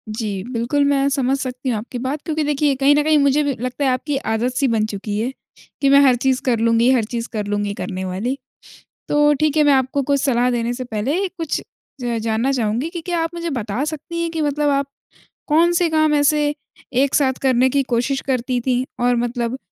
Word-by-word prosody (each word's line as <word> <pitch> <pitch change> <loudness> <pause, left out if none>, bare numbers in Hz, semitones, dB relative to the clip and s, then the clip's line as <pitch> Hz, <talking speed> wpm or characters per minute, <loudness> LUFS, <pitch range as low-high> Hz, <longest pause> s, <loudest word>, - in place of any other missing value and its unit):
जी, 205 -4 -3
बिल्कुल 250 +4 0
मैं 280 -1 +2
समझ 270 -1 +1
सकती 255 -1 -4
हूँ 235 - 0
आपकी 235 +4 -6
बात 270 +4 -3
क्योंकि 315 -2 -1
देखिए 290 -1 +1
कहीं 280 +2 +6
न 295 - +3
कहीं 310 0 +3
मुझे 280 +1 +3
भी 285 -1 0
लगता 255 +4 -2
है - - +3
आपकी 275 +3 -1 0.2
आदत 240 +3 -1
सी 275 - +2
बन 225 -2 +1
चुकी 205 0 -4
है। 240 +4 -1 0.5
कि 275 - +3
मैं 280 - +7
हर 265 -3 +5
चीज़ 260 +1 0
कर 235 -3 +2
लूँगी, 230 +1 +3
हर 250 -4 +3
चीज़ 235 +1 -4
कर 210 -2 -2
लूँगी 205 0 -1
करने 190 -2 -5
वाली। 205 +9 -2 0.7
तो 295 0 +4
ठीक 310 0 +1
है 305 - +5
मैं 290 -1 +5
आपको 265 +1 +1
कुछ 280 -1 +2
सलाह 250 -3 +2
देने 240 0 -1
से 255 +1 -5
पहले 255 - -1
कुछ 335 -4 -4 0.4
ज 240 -2 -1
जानना 225 +4 0
चाहूँगी 240 +3 -1
कि 340 -1 -6
क्या 345 0 -2
आप 330 - -2
मुझे 340 0 -4
बता 235 -3 -2
सकती 315 +2 -5
हैं 335 - -1
कि 325 - -2
मतलब 295 0 +1
आप 280 -1 +1 0.6
कौन-से 340 +3 +3
काम 310 -1 +3
ऐसे 295 +1 +3 0.5
एक 265 +2 +1
साथ 270 -3 +3
करने 260 -1 +3
की 280 +1 +2
कोशिश 255 +2 -1
करती 255 -1 -1
थीं? 255 0 +1 0.2
और 245 0 +3
मतलब 240 +1 -2
265 Hz, 215 wpm, -20 LUFS, 235-290 Hz, 0.7 s, मैं